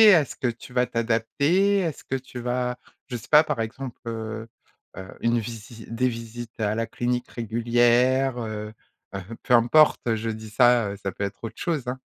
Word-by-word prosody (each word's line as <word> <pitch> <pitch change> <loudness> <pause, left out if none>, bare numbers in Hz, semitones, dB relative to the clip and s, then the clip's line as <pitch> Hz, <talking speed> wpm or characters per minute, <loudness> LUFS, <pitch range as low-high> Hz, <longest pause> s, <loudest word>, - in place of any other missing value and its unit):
Est-ce 150 -6 +1
que 130 - -1
tu 120 +1 -6
vas 125 -1 +2
t'adapter? 140 - +2
Est-ce 165 -6 -3
que 135 - -3
tu 130 -1 -7
vas? 125 0 -1 0.3
Je 125 - -4
sais 110 - -12
pas, 150 0 +8
par 150 -7 -2
exemple, 120 +3 -5
heu 110 0 -5 0.5
heu, 95 - -7
une 115 0 +2
visi 115 0 -8
des 125 +3 +1
visites 115 0 -8
à 105 0 0
la 115 0 0
clinique 125 +2 -2
régulière? 120 +3 +2
Heu 110 -1 -5 0.4
heu, 95 - -3 0.2
peu 125 - +1
importe, 120 0 +5
je 110 +1 -3
dis 110 -1 -6
ça, 120 -1 +4
heu, 100 - -6
ça 100 -2 -4
peut 100 - -4
être 100 +1 -4
autre 115 - -8
chose 150 -8 -2
hein. 130 +1 -3
120 Hz, 190 wpm, -25 LUFS, 110-125 Hz, 0.5 s, pas